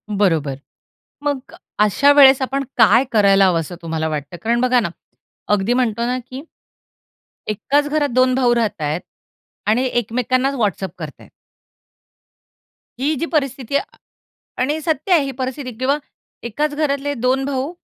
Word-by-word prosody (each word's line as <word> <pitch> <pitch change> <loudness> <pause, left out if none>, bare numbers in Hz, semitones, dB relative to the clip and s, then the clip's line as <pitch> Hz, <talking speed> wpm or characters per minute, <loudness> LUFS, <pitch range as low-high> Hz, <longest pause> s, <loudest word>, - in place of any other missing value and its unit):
बरोबर. 165 -9 +1 0.7
मग 285 -3 -3 0.2
अशा 215 +7 +4
वेळेस 275 -2 +7
आपण 275 +1 -1
काय 235 +2 +5
करायला 200 -3 +5
हवं, 175 -3 +2
असं 165 +2 -7
तुम्हाला 160 -1 -2
वाटतं? 150 +2 -5
कारण 235 +2 +1
बघा 250 0 +3
ना, 220 - -2 0.6
अगदी 210 +3 +2
म्हणतो 235 -2 0
ना 250 +1 -1
की 260 +2 -8 1.1
एकाच 285 +7 0
घरात 295 -1 +1
2 255 +1 +3
भाऊ 250 -2 +3
राहता 220 -8 -1
आहेत 150 +4 -2 0.7
आणि 225 +4 +2
एकमेकांनाच 250 +3 0
वॉट्सॲप 200 -5 -1
करता - - -8
आहेत. - - -17 1.7
ही 285 +4 +1
जी 335 - -1
परिस्थिती 275 -3 0 0.8
आणि 290 +5 0
सत्य 315 +3 -2
आहे 320 -5 +4
ही 275 - -3
परिस्थिती 255 0 -4
किंवा 265 +4 +1 0.5
एकाच 295 +6 -1
घरातले 285 -1 -1
2 255 +2 0
भाऊ, 275 +3 -2
255 Hz, 140 wpm, -19 LUFS, 210-275 Hz, 1.7 s, वेळेस